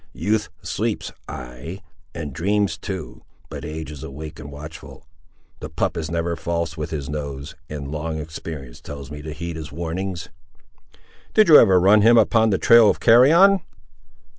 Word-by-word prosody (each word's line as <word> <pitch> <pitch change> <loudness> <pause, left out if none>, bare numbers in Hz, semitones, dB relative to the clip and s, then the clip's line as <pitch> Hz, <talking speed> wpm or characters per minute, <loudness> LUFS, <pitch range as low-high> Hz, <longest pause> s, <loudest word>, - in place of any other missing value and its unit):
—"Youth 105 +1 -1
sleeps, - - -2 0.2
ay, 60 +9 -8 0.4
and 75 -5 -5
dreams 100 +6 0
too; 95 -2 -7 0.3
but 75 -2 -7
age 75 0 -6
is 75 -3 -9
awake 75 +3 -8
and 70 -1 -9
watchful. 75 +2 -11 0.5
The - - -7
pup - - -1
is 80 -2 -4
never 85 +1 -1
false 85 -1 -3
with 75 -2 -5
his 70 -4 -4
nose, 70 -1 -5 0.2
and 70 -2 -6
long 80 +1 -3
experience 80 -4 -8
tells 70 -1 -9
me 75 0 -7
to 75 +1 -7
heed 85 +2 -6
his 80 -2 -8
warnings." 85 +2 -4 1.1
"Did 215 -4 +5
you 150 - +10
ever 95 -5 +5
run 100 +4 +5
him 115 +3 +6
upon 110 0 +4
the 95 - +2
trail 115 -1 +6
of - - 0
carrion?" 165 +12 +6
80 Hz, 165 wpm, -22 LUFS, 75-100 Hz, 1.1 s, you